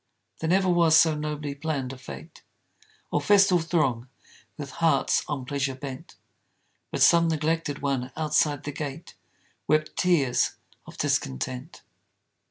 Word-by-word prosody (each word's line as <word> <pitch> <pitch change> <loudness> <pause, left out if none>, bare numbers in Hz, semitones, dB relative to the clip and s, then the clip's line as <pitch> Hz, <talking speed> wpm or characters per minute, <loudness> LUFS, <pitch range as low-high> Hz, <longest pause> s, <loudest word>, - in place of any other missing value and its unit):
There 160 - -2
never 190 +1 +3
was 170 -3 +5
so 160 -1 +4
nobly 150 -1 -4
planned 140 -3 -3
a - - -8
fête, 70 - -11 0.7
Or 150 - +1
festal 195 +1 +5
throng 135 -8 0 0.5
with 145 -3 -7
hearts 155 -5 +2
on 140 -4 -4
pleasure 135 0 -2
bent, 130 -1 -9 0.7
But - - +1
some 170 0 +5
neglected 160 -2 -1
one 135 -2 -1
outside 150 -2 +1
the 145 - -4
gate 145 +2 -7 0.5
Wept 155 0 +1
tears 145 -9 +2 0.3
of - - -12
discontent. 125 - -3
150 Hz, 130 wpm, -26 LUFS, 135-160 Hz, 0.7 s, was